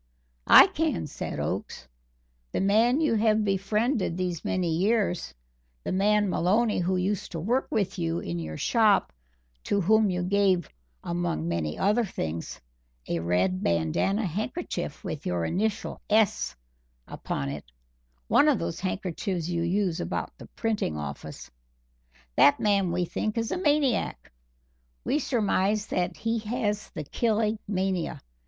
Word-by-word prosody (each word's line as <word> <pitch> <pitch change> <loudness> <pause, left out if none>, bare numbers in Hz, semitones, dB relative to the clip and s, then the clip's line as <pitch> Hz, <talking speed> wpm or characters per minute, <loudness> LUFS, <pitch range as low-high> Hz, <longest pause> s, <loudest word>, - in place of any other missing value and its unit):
"I - - +10
can," 80 - -1
said - - -5
Oakes. 65 - -4 0.7
"The - - 0
man 225 +8 +3
you 305 -6 +2
have 215 -1 +2
befriended 200 +1 0
these 180 -3 -2
many 175 -3 0
years, 195 - 0 0.5
the - - -3
man 205 +2 +3
Maloney 210 +5 +2
who 180 +1 0
used 190 +2 -2
to 165 - -3
work 240 +11 0
with 200 -3 -1
you 165 0 -1
in 85 - -4
your 80 -1 -5
shop, 220 -4 +3 0.5
to 200 - +1
whom 215 +3 +4
you 180 -1 -1
gave, 190 -2 +2 0.4
among 170 - -2
many 80 -3 -2
other 210 +5 +2
things, 80 - -4 0.5
a 85 - -1
red 90 +2 +1
bandana 85 - +1
handkerchief 215 - -4
with 150 - -5
your 85 -2 0
initial 210 - -2
'S' 215 -1 +2 0.5
upon 70 0 -4
it 70 -3 -7 0.6
one 300 - +5
of 280 - +3
those 165 -2 -4
handkerchiefs 185 -2 -3
you 170 -1 -1
use 180 0 0
about - - -3
the - - -10
printing 215 - -1
office 75 - -7 0.9
that 145 - +6
man, 200 -4 +2
we 175 +1 0
think, 215 +6 -3
is 230 -1 -1
a - - 0
maniac. 290 - +1 0.7
We 290 - +1
surmise 210 -5 +1
that 180 -3 -2
he 225 0 -1
has 210 -1 -2
the 155 - -6
killing 220 - 0
mania. 190 -3 -1
195 Hz, 140 wpm, -27 LUFS, 165-215 Hz, 0.9 s, I